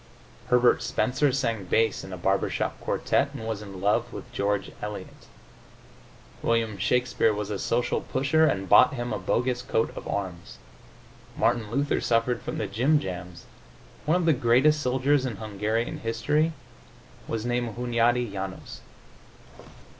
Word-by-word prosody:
Herbert 125 0 +4
Spencer 130 +3 +1
sang 115 -7 -1
bass 110 +4 +1
in 95 - -9
a 90 - -5
barber 95 +2 +1
shop - - -3
quartette - - 0
and 110 - -6
was 110 -2 -3
in 100 -3 -9
love 115 +4 +1
with 125 - -9
George 100 -3 -1
Eliot. 105 0 -7 1.1
William 115 -3 0
Shakespeare 125 +1 +2
was 105 0 -3
a 100 - -3
social 120 +4 0
pusher 150 +4 +2
and 95 -6 -1
bought 125 +8 +6
him 120 -1 -3
a - - -2
bogus 125 +6 0
coat 120 -3 -1
of - - -7
arms. 90 -4 -5 0.8
Martin 115 -3 +1
Luther 140 +5 0
suffered 115 +1 +1
from - - -5
the - - -1
jim 125 +10 +2
jams. 90 -5 -7 0.6
One 155 +4 +3
of 180 - -1
the 165 - +5
greatest 130 +5 +3
soldiers 130 +2 +2
in 125 -5 -3
Hungarian 110 +2 -2
history 130 +8 0 0.7
was 115 0 -3
named 120 -2 -1
Hunjadi 120 -1 +1
Janos.... 95 -1 -6
115 Hz, 145 wpm, -26 LUFS, 105-125 Hz, 1.1 s, bought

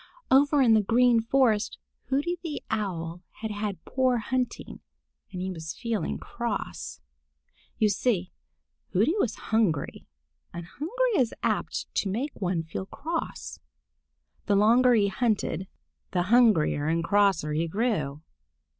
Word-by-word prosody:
Over 280 +1 +5
in 230 -3 +5
the 215 - +5
Green 235 +2 +4
Forest 225 -3 +2 0.3
Hooty 290 +7 -1
the 325 -4 -5
Owl 175 -6 -3 0.2
had 220 -1 -3
had 205 -4 -4
poor 255 -2 +1
hunting, 250 +2 -3 0.5
and 180 -1 -5
he 190 - -3
was 160 -2 -6
feeling 220 - -2
cross. - - -5 0.8
You 215 - +3
see, 200 -3 0 0.6
Hooty 215 - +3
was 245 - 0 0.2
hungry, 200 -10 0 0.5
and 170 0 -6
hunger 345 - -2
is 250 -9 +1
apt - - -1
to 200 - 0
make 250 +10 -2
one 175 -3 0
feel 165 +4 -6
cross. 325 +8 -5 0.9
The 205 - +3
longer 240 +5 +5
he 205 -3 +3
hunted, 205 -3 -1 0.5
the 180 -1 +2
hungrier 190 -11 +4
and 165 +1 +1
crosser 190 -5 +2
he 165 +2 0
grew. 160 - -1
215 Hz, 130 wpm, -27 LUFS, 180-250 Hz, 0.9 s, Over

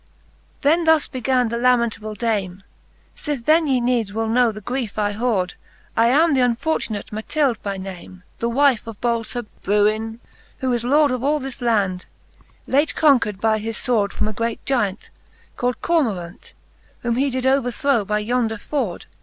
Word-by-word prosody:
XXIX. - - -35
Then 320 +4 +3
thus 320 -1 +4
began 255 -2 0
the 235 +1 -2
lamentable 235 -4 +1
dame; 195 -4 -2 0.5
Sith 285 -6 -4
then 315 0 +4
ye 265 -2 +2
needs 240 -4 0
will 225 +2 -2
know 240 +1 +3
the 215 - -8
griefe 240 0 -4
I 205 -1 0
hoord^,, 205 -5 0 0.4
I 230 +1 +4
am 305 +6 +4
th'unfortunate 245 -3 0
Matilde 240 +4 -1
by 200 -1 -3
name. 185 -1 -9 0.2
The 235 - 0
wife 265 -2 +2
of 225 -2 -8
bold 235 -2 0
Sir 245 -1 -4 0.2
Bruin, 215 +2 +1 0.4
who 260 -3 -1
is 240 -1 0
lord 285 +3 +3
Of 255 -1 -2
all 300 +2 +2
this 265 -2 -6
land, 200 -6 0 0.6
late 285 +4 +1
conquer'd 245 -10 +3
by 220 0 +2
his 225 +1 -4
fword^' 215 -5 +1
From - - -2
a 215 - -3
great 230 +1 -3
gyant, 215 -7 -1 0.4
called' 245 0 -2
Cormoraunt; 215 - -1 0.5
Whom 235 -1 0
he 275 +2 +2
did 260 0 -3
overthrow 265 -2 +2
by 210 +1 -1
yonder 225 +1 0
foord 225 -5 -3
235 Hz, 170 wpm, -21 LUFS, 215-265 Hz, 0.6 s, thus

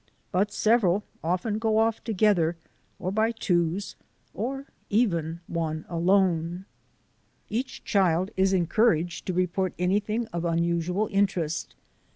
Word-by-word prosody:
But 195 +3 +1
several 210 -3 +3 0.2
often 185 +6 -1
go 220 -1 +1
off 225 0 +1
together, 190 -6 +2 0.4
or 185 - -3
by 220 +3 +2
twos, 180 -3 -1 0.4
or 270 +6 -3 0.2
even 170 -7 +1
one 160 -2 -3
alone. 175 0 +1 0.9
Each 245 +4 -3
child 190 -5 +2
is 190 0 +3
encouraged 175 -2 +1
to 185 - 0
report 185 +1 0
anything 210 +5 0
of 170 -1 -2
unusual 170 +4 0
interest. 185 -6 0
185 Hz, 115 wpm, -26 LUFS, 170-215 Hz, 0.9 s, several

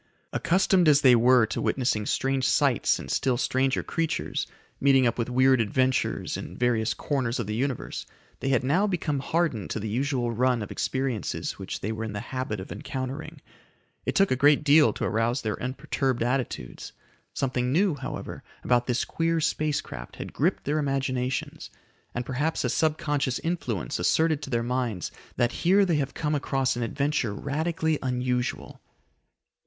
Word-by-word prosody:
Accustomed 185 0 +3
as 145 -1 +6
they 125 -2 +7
were 120 0 +5
to 110 - -3
witnessing 120 -5 0
strange 135 -1 +1
sights - - +3
and - - -7
still 130 -2 +1
stranger 130 +1 +1
creatures, 165 -1 -2 0.3
meeting 135 -2 +4
up 120 0 0
with 115 - -1
weird 130 0 +4
adventures 130 +4 0
in - - -8
various 120 -2 +1
corners 130 -4 -1
of - - -1
the 105 - -3
Universe, 130 +2 -3 0.3
they 135 - -2
had 130 -2 +2
now 170 +11 +2
become 160 -7 -1
hardened 155 - -1
to - - -2
the 110 - -4
usual 125 +1 -1
run 125 0 +1
of 105 - -8
experiences 130 -5 -2
which - - -5
they 105 - -2
were 110 0 -4
in 110 -2 -4
the 105 - -3
habit 130 -5 -2
of 95 - -8
encountering. 130 0 -5 0.6
It - - -2
took 195 0 +4
a - - +4
great 145 +3 +4
deal 150 +1 +6
to - - -5
arouse 115 +4 0
their 110 -2 -3
unperturbed 130 -1 -1
attitudes. 120 - -3 0.4
Something 125 -2 0
new, 180 +4 +3
however, 135 -2 -6 0.2
about 120 -1 +2
this 125 -1 0
queer 165 0 0
space 155 -1 0
craft - - -9
had - - -7
gripped - - 0
their 150 +2 0
imaginations, 135 -2 -2 0.5
and 120 0 -2
perhaps 145 +6 -1
a - - 0
subconscious 145 -4 0
influence 125 - -2
asserted 160 -2 +2
to - - -6
their 120 -2 0
minds 120 -6 -2 0.2
that 120 0 +2
here 195 +3 +5
they 170 -4 +1
have 140 -2 -2
come 150 -1 -1
across 135 -2 0
an 120 - -3
adventure 135 -2 -1
radically 160 +4 -1
unusual. 125 -1 -2
130 Hz, 170 wpm, -26 LUFS, 120-145 Hz, 0.6 s, they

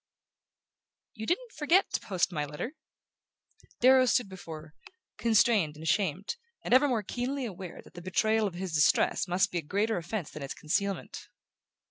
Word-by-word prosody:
"You 220 -3 -7
didn't 460 +7 -1
forget 330 +6 +2
to - - +1
post 190 -3 0
my 150 -4 -1
letter?" 150 - -5 1.1
Darrow 255 +1 +6
stood 245 -3 +2
before 165 -4 -8
her, 155 0 -17 0.4
constrained 210 -8 +3
and 155 - -10
ashamed, 190 - 0 0.3
and - - 0
ever 265 +3 +6
more 235 -6 0
keenly 250 +6 -3
aware 190 -5 -8
that - - -18
the 175 - -9
betrayal 215 +4 +1
of 180 - -7
his 185 -1 -4
distress 150 +4 +3
must 180 +3 +2
be 175 - -1
a - - -4
greater 205 +8 0
offense 175 0 -4
than 155 - -8
its 140 - -5
concealment. 195 +4 -2
195 Hz, 165 wpm, -29 LUFS, 170-240 Hz, 1.1 s, Darrow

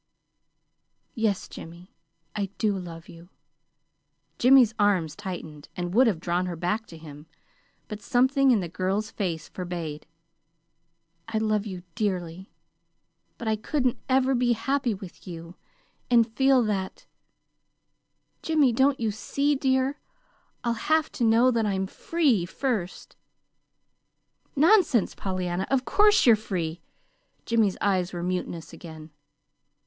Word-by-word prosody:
"Yes, 220 -4 -1
Jimmy, 170 +3 -11 0.4
I 205 -2 -1
do 210 -2 +1
love 170 -3 -8
you." 170 +1 -14 1.1
Jimmy's 250 -3 +6
arms 190 -7 +2
tightened, 170 -7 -8
and 175 0 -3
would 250 +4 +5
have 195 -8 0
drawn 175 +1 -1
her 175 - -4
back 180 +7 -2
to 165 - -11
him; 150 -1 -12 0.6
but 210 0 -7
something 265 +2 +3
in 230 -6 +4
the 175 - -4
girl's 190 +5 -2
face 170 -6 -3
forbade. 170 -5 -6 1.2
"I 225 -1 -2
love 215 -1 0
you 185 -3 -7
dearly. 185 -4 -3 0.9
But 235 - -6
I 220 - +2
couldn't 255 +2 -1
ever 265 0 +3
be 245 -1 +2
happy 255 0 -1
with 190 -1 -12
you 170 0 -9 0.5
and 230 -2 +3
feel 265 -2 +4
that 195 -3 -3 1.4
Jimmy, 305 -5 +3
don't 270 +3 +2
you 225 -2 0
see, 280 +7 -1
dear? 265 +1 0 0.6
I'll 235 -1 +1 0.2
have 315 0 +2
to 245 - -3
know 230 +3 +5
that 225 -3 0
I'm 190 -1 -1
free, 250 - 0
first." 215 -5 -3 1.4
"Nonsense, 315 - +4
Pollyanna! 185 -1 -3
Of 265 -1 +1
course 415 - +4
you're 235 -3 +7
free!" 175 -6 -4 0.6
Jimmy's 220 -4 +1
eyes 185 -3 +1
were 175 -1 -4
mutinous 175 -2 -4
again. 160 -2 -11
210 Hz, 125 wpm, -26 LUFS, 175-250 Hz, 1.4 s, you're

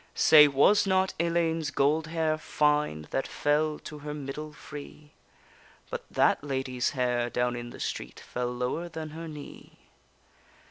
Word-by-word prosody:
Say, 150 -1 +8
was 145 +10 +4
not 190 0 +2
Ellayne's 165 -2 +1
gold 150 +3 +1
hair 160 -1 0
fine, 150 - +1
That 135 - -1
fell 150 +1 +1
to 150 - -8
her 150 0 -6
middle 150 +2 -6
free? 150 0 -11 0.8
But - - -5
that - - +2
lady's 130 -2 -1
hair 120 -1 +1
down 125 0 0
in 120 0 -6
the - - -11
street, - - -5
Fell 125 0 -4
lower 125 +8 -3
than 160 -2 -6
her 165 +1 -7
knee. 150 -2 -11
150 Hz, 145 wpm, -28 LUFS, 130-160 Hz, 0.8 s, Say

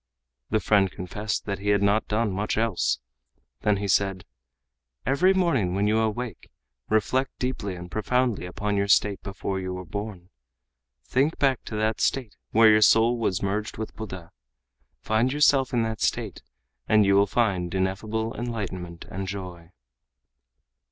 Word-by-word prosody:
The 110 - +2
friend 100 -3 +3
confessed 105 +5 -4
that 100 -2 -3
he 100 +1 -2
had 100 -1 +3
not 105 +2 +2
done 105 0 0
much 100 +3 -2
else. 110 -4 +1 0.6
Then 105 -1 +2
he 100 +1 -3
said: 95 -1 +1 0.8
"Every 180 +8 +3
morning 160 - +1
when 100 +1 +1
you 110 +1 +2
awake, 110 -2 -3 0.4
reflect 130 +5 +1
deeply 125 -7 -3
and 90 0 -9
profoundly 115 -1 0
upon 105 +2 -2
your 100 0 +1
state 100 0 +3
before 95 0 -4
you 95 0 -4
were 90 0 -7
born. 100 -3 -6 0.7
Think 135 - +1
back 135 -3 +2
to 110 - -6
that 110 +1 0
state 125 -7 0
where 110 0 +6
your 105 0 +5
soul 115 +3 +5
was 100 -5 -1
merged 105 +2 -2
with 110 - -5
Buddha. 95 -6 -8 0.7
Find 110 +4 +1
yourself 140 -2 +3
in 120 -2 +1
that 110 -1 -3
state - - -1 0.5
and 105 -1 +5
you 100 - +4
will 100 +1 +5
find 100 -6 0
ineffable 110 +4 -2
enlightenment 95 -8 -5
and 95 +1 -5
joy." 90 -3 -7
105 Hz, 155 wpm, -25 LUFS, 95-115 Hz, 0.8 s, where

